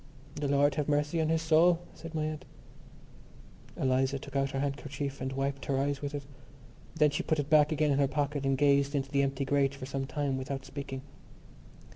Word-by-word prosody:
"The 145 -1 -2
Lord 140 +1 +3
have 150 +1 -2
mercy 150 +3 +1
on 160 - 0
his 160 0 +1
soul!" 165 +2 +5 0.2
said 160 0 -9
my 155 -1 0
aunt. 155 -1 -4 1.3
Eliza 130 +1 +1
took 135 - -10
out 135 0 +1
her 135 - -3
handkerchief 140 0 -3
and 130 - -2
wiped 135 +1 -2
her 135 - 0
eyes 140 +1 0
with 145 0 -4
it. 145 - -4 0.7
Then 150 -2 +4
she 145 - -1
put 155 - 0
it 145 0 -3
back 150 -1 +6
again 150 -1 +2
in 140 - +2
her 140 - +4
pocket 145 0 -1
and 135 -1 +1
gazed 140 0 +3
into 135 -1 -2
the 140 -1 +3
empty 135 0 -1
grate 140 0 +2
for 140 - -7
some 135 0 -3
time 140 -2 -1
without 130 0 -5
speaking. 135 -1 -6
140 Hz, 205 wpm, -30 LUFS, 135-150 Hz, 1.3 s, back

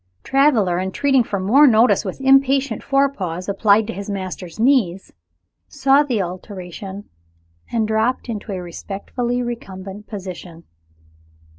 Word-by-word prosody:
Traveler, 240 -11 +2
entreating 255 +8 +1
for 200 -3 -3
more 255 +11 +5
notice 230 0 +4
with - - -6
impatient 270 -2 +3
forepaws 240 -12 -1
applied 205 +1 +3
to 230 - -5
his 200 +1 -7
master's 185 -2 -6
knees, 220 -8 +1 0.5
saw 275 0 +3
the 255 -7 -1
alteration, 185 +2 -8 0.6
and 225 -2 0
dropped 220 +4 0
into 215 -2 -5
a 190 - -3
respectfully 235 +8 -4
recumbent 200 -4 -7
position. 180 -4 -8
215 Hz, 120 wpm, -20 LUFS, 190-260 Hz, 0.6 s, more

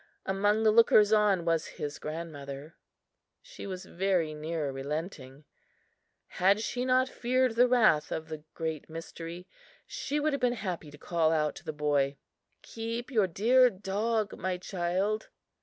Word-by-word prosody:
Among 205 +3 +1
the 215 - +5
lookers 215 -1 +6
on 205 -5 +3
was 165 -1 +1
his 145 0 -4
grandmother. 150 -2 -7 0.6
She - - -10
was 185 -1 -6
very 180 -4 0
near 155 -1 -3
relenting. 140 0 -5 0.8
Had 195 +3 +2
she 245 +2 -2
not 255 0 +3
feared 255 0 +1
the 245 +2 +5
wrath 220 -12 +3
of 160 0 -3
the 155 -2 -7
Great 160 -1 -4
Mystery, 165 +2 -8 0.4
she 290 +2 -3
would 300 0 +1
have 280 - -2
been 245 -1 +2
happy 185 -9 -5
to 145 - -13
call 165 0 +1
out 150 -2 +1
to - - -11
the - - -4
boy: 145 -2 0 0.5
"Keep 230 +3 -5
your 215 -6 +3
dear 245 +8 +4
dog, 210 +2 -2
my 185 0 -2
child!" 190 +4 -2
185 Hz, 150 wpm, -29 LUFS, 155-220 Hz, 0.8 s, lookers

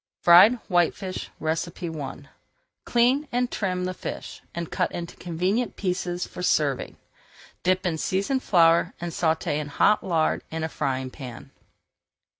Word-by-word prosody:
FRIED 180 +7 +8
WHITEFISH 185 +1 0
I 160 -4 -4 0.6
Clean 255 +5 +2
and 245 0 0
trim 185 -3 -1
the 185 - -2
fish - - -7
and 170 -1 -4
cut 180 -2 0
into 170 -1 -6
convenient 185 +7 -1
pieces 180 -2 -2
for - - -9
serving. 145 -6 0 0.6
Dip 185 +1 +1
in 165 -3 -1
seasoned 200 - 0
flour 170 -5 +4
and 175 0 -4
sauté 160 -2 0
in 150 -1 -3
hot 200 +8 +3
lard 165 -4 +1
in 160 0 -4
a 160 - -1
frying 130 -3 -2
pan. 125 -5 -9
175 Hz, 135 wpm, -25 LUFS, 160-190 Hz, 0.6 s, FRIED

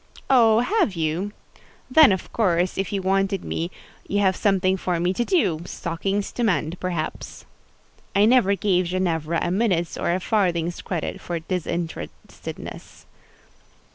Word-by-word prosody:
"Oh, 230 -3 +6
have 360 - +1
you? 165 +5 -1 0.6
Then, 305 -3 +8
of 190 - -3
course, 180 -5 +1
if 195 -2 -2
you 195 -2 -2
wanted 195 0 +1
me, 170 +1 -2 0.4
you 205 - 0
have 190 -2 +3
something 190 -2 +2
for 180 -2 -2
me 175 +2 +1
to 240 - 0
do: 190 - +1
stockings 195 +4 -3
to 240 - -3
mend, 175 -5 0
perhaps." 175 -4 -4 0.7
I 200 +1 +5
never 220 -4 +4
gave 185 -3 +1
Ginevra 170 -3 -1
a 175 - -1
minute's 185 -4 0
or - - 0
a 180 - +1
farthing's 175 -4 0
credit 170 -4 -4
for 175 - -3
disinterestedness. 170 -1 -6
185 Hz, 140 wpm, -23 LUFS, 170-205 Hz, 0.7 s, Then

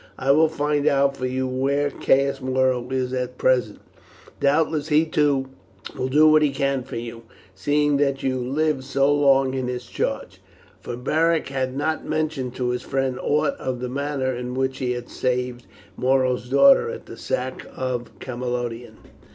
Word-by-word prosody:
I 135 - +2
will 155 +3 +5
find 150 -1 0
out 140 0 +3
for 130 -1 -3
you 130 +1 -1
where 140 +3 0
Caius 135 +1 +1
Muro 130 -1 +1
is 130 -1 -2
at 125 0 -3
present; 125 -5 +1 0.6
doubtless 150 +1 +1
he 155 +1 +3
too 145 -4 +1 0.5
will 130 - -2
do 150 +4 +5
what 155 0 +6
he 150 - +3
can 135 -1 -1
for 125 - -9
you, 115 0 -6 0.3
seeing 145 +8 +1
that 140 -1 0
you 130 -1 0
lived 140 +2 0
so 135 +1 +2
long 135 -2 +3
in 130 -1 -2
his 125 0 -4
charge;" - - -4 0.4
for 120 - -6
Beric 160 +5 +1
had 130 -1 -2
not 155 +2 -1
mentioned 150 -5 -2
to 125 -1 -1
his 125 0 -2
friend 135 -1 -2
aught 150 - +1
of 130 -2 -3
the 125 0 -4
manner 140 -1 -2
in 125 +1 -5
which 130 0 -1
he 125 -1 -1
had 120 0 -6
saved 125 -1 -2 0.3
Muro's 130 0 +1
daughter 275 - +6
at 475 - -7
the - - -10
sack - - -4
of 125 -2 -4
Camalodunum. 120 -2 -4
130 Hz, 170 wpm, -23 LUFS, 125-145 Hz, 0.6 s, what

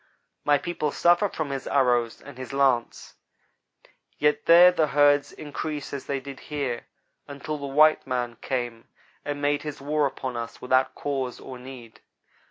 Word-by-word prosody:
My 145 0 +4
people 165 -1 -2
suffer 175 +6 +3
from 155 -5 -4
his 135 -1 -4
arrows 120 -4 +1
and 140 -2 -12
his 130 0 -7
lance, 135 -4 0 1.0
yet 150 0 +1
there 175 +2 +9
the 165 -3 +1
herds 145 0 +3
increase 150 0 -6
as 140 - -6
they 140 -1 -1
did 135 0 -9
here, 140 -6 -4 0.4
until 145 +2 -5
the 140 - -5
white 155 +3 +4
man 120 -2 -2
came 120 -3 -3 0.4
and 145 0 -4
made 145 0 +1
his 150 -1 -6
war 145 +1 +1
upon 130 -2 -5
us 115 0 -6
without 130 +1 +1
cause 135 -3 -3
or 130 -1 -9
need. 125 -3 -11
140 Hz, 160 wpm, -25 LUFS, 130-150 Hz, 1.0 s, there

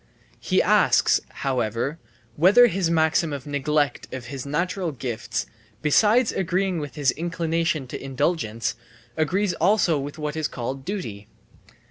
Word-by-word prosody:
He - - +2
asks, - - +4
however, 125 +3 -2 0.4
whether 200 +10 +7
his 190 -6 0
maxim 160 0 +2
of 140 -3 -5
neglect 145 0 -1
of 130 -2 -6
his 135 0 -6
natural 175 +4 -1
gifts, 120 - -4 0.4
besides 215 - +4
agreeing 185 0 0
with 145 -2 -6
his 145 -3 +2
inclination 165 -2 -1
to 125 - -7
indulgence, 130 -4 -1 0.4
agrees 180 +5 +1
also 185 -7 +2
with 145 +2 -6
what 150 -1 -4
is 155 -2 -1
called 130 +2 -5
duty. 115 - -5
155 Hz, 130 wpm, -24 LUFS, 135-175 Hz, 0.4 s, whether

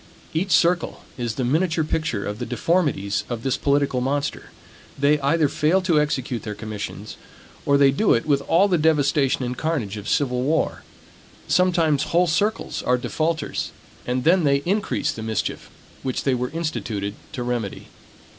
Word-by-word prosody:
Each 180 +5 -1
circle 170 -1 +2
is 120 -3 -3
the 130 - -2
miniature 160 +5 +1
picture 155 -9 -2
of 105 +2 -4
the 120 - -3
deformities 145 - 0
of 120 -2 -4
this 135 -1 +1
political 140 -2 +1
monster. 140 +3 -2 0.5
They 145 +2 +3
either 150 +3 +2
fail 155 +6 +2
to 165 -5 +3
execute 130 -5 -2
their 105 -1 -5
commissions, 105 -1 -6 0.5
or 140 0 +5
they 140 -1 +5
do 200 +11 +3
it 115 - -1
with 140 -2 +2
all 185 +5 +4
the 180 -4 +2
devastation 145 -4 +2
and 125 +1 -3
carnage 130 -11 -2
of 105 0 -6
civil 125 -3 +1
war. 150 +5 0 0.7
Sometimes 170 -6 +2
whole 175 +2 +3
circles 205 +6 0
are 125 0 +2
defaulters; 155 +3 -2 0.4
and 125 +1 0
then 175 +2 +4
they 140 -1 +2
increase 200 +3 0
the 110 - -7
mischief 110 0 -3 0.3
which 130 -1 -2
they 135 - +2
were 125 0 -1
instituted 115 -11 -3 0.2
to 125 -4 -3
remedy. 120 -4 -3
140 Hz, 165 wpm, -23 LUFS, 125-160 Hz, 0.7 s, or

